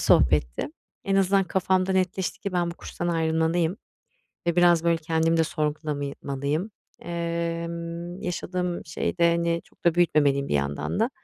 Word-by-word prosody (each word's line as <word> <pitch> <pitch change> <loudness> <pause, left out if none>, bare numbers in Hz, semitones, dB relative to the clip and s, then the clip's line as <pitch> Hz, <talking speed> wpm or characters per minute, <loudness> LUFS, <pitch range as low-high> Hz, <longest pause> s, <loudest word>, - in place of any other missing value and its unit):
sohbetti. 60 - +3 0.4
En 195 -1 +1
azından 195 0 +3
kafamda 185 +1 +1
netleşti 185 0 0
ki 200 - -4
ben 175 -1 +1
bu - - -7
kurstan 175 0 -5
ayrılmalıyım 165 +1 +1 0.7
ve 170 0 +1
biraz, 175 -1 +5
böyle, 170 0 +4
kendimi 165 +1 +1
de 160 - +4
sorgulamalıyım. 150 +2 -2 0.3
Emm, 170 +1 -3
yaşadığım 180 0 -2
şeyde, 170 +2 +1
hani, 170 0 0
çok - - -28
da 170 -1 +4
büyütmemeliyim 145 -5 +3
bir - - -1
yandan 70 - -1
da. 230 +4 +2
170 Hz, 140 wpm, -26 LUFS, 160-175 Hz, 0.7 s, biraz